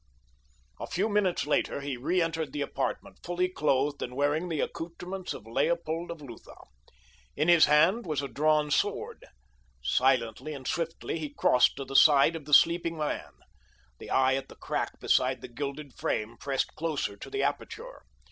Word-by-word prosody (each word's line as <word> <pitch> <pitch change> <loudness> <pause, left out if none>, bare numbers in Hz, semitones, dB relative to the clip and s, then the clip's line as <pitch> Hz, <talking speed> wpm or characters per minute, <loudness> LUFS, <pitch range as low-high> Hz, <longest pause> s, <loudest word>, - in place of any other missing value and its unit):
A - - -5
few 195 +4 0
minutes 205 -6 +1
later 150 -1 0
he 140 -1 -3
reentered 165 +2 -1
the 145 - -1
apartment - - -4
fully 175 +1 0
clothed 145 -4 0
and 125 - -5
wearing 145 +5 0
the 160 -3 -2
accouterments 175 +3 -5
of - - -7
Leopold 165 +7 -1
of 170 -2 -7
Lutha. 120 -5 -11 0.8
In 150 +3 0
his 170 -2 +7
hand 185 +9 +3
was 150 -3 -1
a - - -2
drawn 150 +1 +1
sword. - - -1 0.6
Silently 125 - +1
and 130 -2 -8
swiftly 165 0 -3
he 150 -2 -4
crossed 125 -3 +3
to 135 - -6
the 135 +1 -8
side 145 +2 +6
of 155 -3 -7
the 150 - -5
sleeping 170 0 +3
man. 145 - -3 0.7
The - - -10
eye 130 0 +3
at 135 0 -3
the - - -12
crack - - -3
beside - - +2
the - - -7
gilded 140 +2 -6
frame 110 +2 -2
pressed 135 +2 -2
closer 155 -10 -2
to - - -9
the 410 - -1
aperture. - - -4
150 Hz, 165 wpm, -28 LUFS, 135-170 Hz, 0.8 s, his